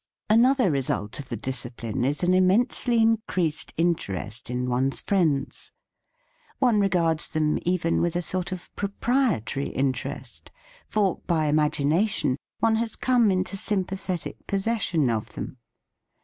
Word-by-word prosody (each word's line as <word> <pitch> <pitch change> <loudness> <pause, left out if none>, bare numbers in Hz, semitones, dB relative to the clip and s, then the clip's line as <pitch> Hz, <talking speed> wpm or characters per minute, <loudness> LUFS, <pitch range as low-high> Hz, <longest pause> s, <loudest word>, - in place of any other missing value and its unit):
:): - - -68
:): - - -67
* - - -50
4: 220 - +6
Another 255 - +4
result 130 -4 -2
of 135 - -8
the 115 - -3
discipline 120 -2 -3
is 145 +6 0
an 180 +1 +3
immensely 230 +6 +3
increased 215 -8 0
interest 120 - -2
in 125 0 -2
one's 130 +2 0
friends. 155 -8 0 0.9
One 245 -5 +3
regards 170 -5 +2
them 155 -1 0
even 175 -2 +1
with 170 0 0
a 175 - 0
sort 185 +2 -2
of 185 -1 -8
proprietary 200 - 0
interest, 130 -2 -3 0.4
for, 200 -4 +1
by 160 -3 +1
imagination, 150 +2 +2 0.2
one 225 -1 +2
has 230 0 -2
come 245 -4 +3
into 185 +1 0
sym 195 0 0
pathetic 185 -2 -5
possession 195 - 0
of 110 -2 -3
them. - - -6
175 Hz, 145 wpm, -25 LUFS, 140-205 Hz, 0.9 s, 4